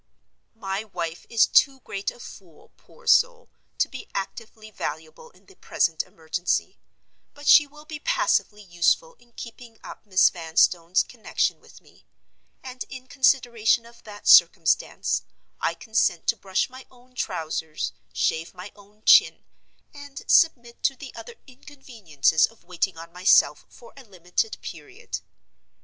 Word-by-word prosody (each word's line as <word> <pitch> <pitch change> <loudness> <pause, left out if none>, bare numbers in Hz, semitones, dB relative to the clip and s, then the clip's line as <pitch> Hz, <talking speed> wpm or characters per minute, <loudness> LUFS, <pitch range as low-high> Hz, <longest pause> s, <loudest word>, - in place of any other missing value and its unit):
My 195 -1 -4
wife 170 -5 -6
is 230 -1 +4
too 270 -1 +3
great 200 -3 -4
a - - -12
fool, 180 -8 -14
poor - - -22
soul, 485 0 +3 0.3
to - - +2
be 260 - -10
actively 215 +2 -7
valuable 160 - -7
in - - -26
the 390 - -19
present 165 - 0
emergency; 165 +2 -3 0.6
but 290 +1 -12
she 295 0 +7
will 300 +1 -16
be 305 -1 -8
passively 255 - 0
useful 185 - +1
in 240 0 -25
keeping 230 -1 -11
up - - -11
Miss 190 -1 +4
Vanstone's 170 +1 +2
connection 235 -3 -2
with - - -18
me—and, 255 -1 -14
in 260 -1 -9
consideration 240 -4 +2
of 235 0 -17
that 205 -1 -11
circumstance, 165 -2 +4 0.4
I 165 - -1
consent 215 -5 0
to - - +3
brush 190 -3 -1
my 260 0 -13
own 250 0 -23
trousers, 160 -8 -4 0.2
shave 160 +3 -2
my 185 +3 -9
own 205 +1 -21
chin, - - +5 0.5
and 285 -1 -10
submit 240 -8 +2
to 270 - +1
the - - -11
other 475 - -10
inconveniences 230 - -1
of 230 - -22
waiting 180 0 -3
on 165 +1 -11
myself 180 +2 +3
for 235 - -17
a 275 - -13
limited 185 +1 -3
period. 155 -4 -8
220 Hz, 140 wpm, -24 LUFS, 175-260 Hz, 0.6 s, she